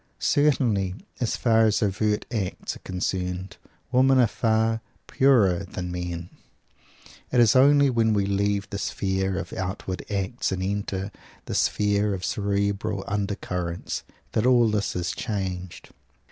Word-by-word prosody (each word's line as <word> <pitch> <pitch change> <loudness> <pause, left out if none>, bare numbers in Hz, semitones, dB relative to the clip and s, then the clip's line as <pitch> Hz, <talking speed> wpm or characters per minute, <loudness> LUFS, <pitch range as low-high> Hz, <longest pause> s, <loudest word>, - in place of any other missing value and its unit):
Certainly, 120 -11 +2 0.2
as 120 - 0
far 115 -2 +4
as 110 0 +2
overt 105 +1 0
acts 100 -5 -3
are - - -12
concerned, 90 0 -3 0.3
women 130 +1 +4
are 125 - +6
far 110 0 +1 0.2
"purer" 115 -10 +4
than 90 -1 -6
men. 90 -1 -5 1.0
It 125 - +3
is 115 -1 +5
only 140 +1 +6
when 115 -2 +2
we 100 -1 +2
leave 100 0 0
the 100 - -3
sphere 95 -1 -1
of - - -5
outward 95 0 -4
acts 100 +4 -2
and 95 -1 -2
enter 100 0 -2 0.3
the - - -5
sphere 105 0 +1
of 95 - -5
cerebral 100 0 -1
undercurrents, 90 -4 -3 0.3
that 110 +3 +1
all 120 -2 +5
this 105 -1 -1
is 90 -1 -1
changed. 95 -5 -4
100 Hz, 135 wpm, -25 LUFS, 95-110 Hz, 1.0 s, are